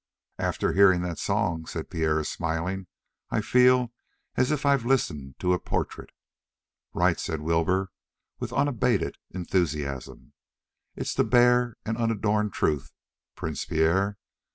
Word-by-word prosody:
"After - - 0
hearing 95 -3 +5
that 90 -2 -4
song," 95 -6 -1
said 80 - -6
Pierre 80 -3 +1
smiling, 90 +4 -3 0.4
"I - - 0
feel 125 +2 +4 0.4
as 130 - +2
if 150 -1 -1
I'd 140 -2 +4
listened 80 - -1
to 90 -1 +1
a 90 - +1
portrait." - - -3 0.8
"Right!" - - +2
said 80 - -3
Wilbur, 85 +4 +1 0.5
with - - -4
unabated 125 -5 +1
enthusiasm. 75 -7 -3 0.6
"It's - - -3
the - - +2
bare 125 -1 +4
and 115 0 -2
unadorned 105 -2 +1
truth, 75 -5 -1 0.4
Prince 80 -3 -4
Pierre. 95 +6 +1
95 Hz, 125 wpm, -26 LUFS, 80-115 Hz, 0.8 s, hearing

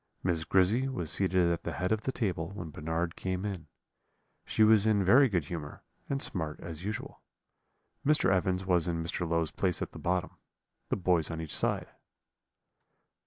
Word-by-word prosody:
Miss 85 -3 0
Grizzy 100 - +3
was 90 - -3
seated 90 -1 +2
at 85 0 -1
the 85 - -4
head 90 +7 -2
of 110 -1 +1
the 130 - -2
table 95 -10 -2
when 85 -5 -6
Bernard 80 +3 -2
came 95 +1 -3
in; 95 -6 -5 0.8
she 110 - +3
was 110 -1 +6
in 100 -3 +3
very 125 +7 +6
good 90 -7 0
humour, 75 -2 -7 0.3
and 135 -1 0
smart 80 -5 -3
as 80 0 -7
usual. 105 +1 -5 0.8
Mr. 150 -9 +4
Evans 95 0 0
was 90 -3 +2
in 85 -1 -1
Mr. 85 +1 -2
Low's 85 -1 0
place 90 -3 0
at - - -4
the - - -10
bottom; 90 +1 -1 0.5
the - - +1
boys 90 -4 +2
on 80 -1 -4
each 80 -2 -3
side. - - 0
90 Hz, 175 wpm, -30 LUFS, 85-100 Hz, 0.8 s, was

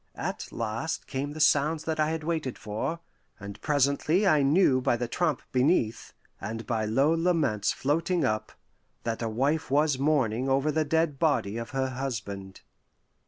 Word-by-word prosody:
At - - -4
last 115 +7 -3
came 140 +2 -4
the 155 - -8
sounds 155 +1 +3
that 160 -1 -3
I 155 0 +2
had 160 -1 -3
waited 155 -6 -2
for, 110 +11 -4 0.4
and 100 0 -9
presently 150 +6 +2
I 155 -6 +4
knew 140 -2 +4
by 120 - +1
the 120 0 -2
tramp 155 +2 -1
beneath, 125 -4 +1 0.3
and 110 +3 -5
by 110 -3 -1
low 135 +8 +2
laments 165 - +1
floating 165 +5 0
up, 110 0 -1 0.5
that 115 0 -3
a 115 - -1
wife 140 +8 0
was 145 0 +2
mourning 135 -4 +1
over 135 +3 +2
the 155 +1 0
dead 160 -2 0
body 140 -10 +1
of 115 0 -5
her 135 -1 -1
husband. 105 -7 -5
140 Hz, 165 wpm, -27 LUFS, 115-155 Hz, 0.5 s, I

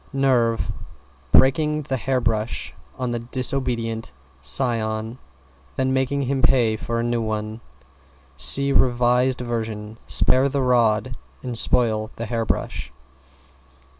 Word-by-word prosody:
=NERVE= 125 -4 +1 0.6
Breaking 150 +3 +3
the 135 -1 -3
hair 130 +2 -1
brush 110 -2 -2 0.2
on 125 -1 -3
the 120 - -2
disobedient 120 -2 -1 0.3
scion, 110 - -1 0.6
then 130 0 0
making 135 +1 0
him 135 +1 -1
pay 120 -2 +3
for 115 +2 -4
a - - -1
new 120 0 -1
one. 110 0 -4 0.7
See 140 - +4
revised 125 0 +2
version, 110 -2 -5
"Spare 130 +2 +4
the 140 0 -1
rod 120 -1 +1 0.3
and 125 -2 -5
spoil 110 -2 +3
the 115 - -5
hair 115 0 -2
brush!" 65 - -3
120 Hz, 120 wpm, -22 LUFS, 110-130 Hz, 0.7 s, See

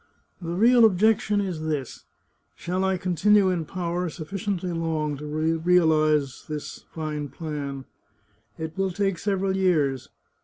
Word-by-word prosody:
The 165 - -5
real 230 +7 +5
objection 210 0 +3
is 180 -5 -3
this: 150 -5 -4 0.5
Shall 180 +2 -2
I 190 0 +1
continue 190 +2 +3
in 170 -3 -2
power 180 0 -2
sufficiently 180 +3 -4
long 160 -3 -1
to 150 +2 -7
realize 155 -2 +2
this 150 -1 -6
fine 150 -2 -4
plan? 140 -4 -5 0.7
It 160 -1 -5
will 195 0 0
take 195 -1 -1
several 195 -1 0
years. 155 -9 +1
170 Hz, 125 wpm, -25 LUFS, 155-190 Hz, 0.7 s, real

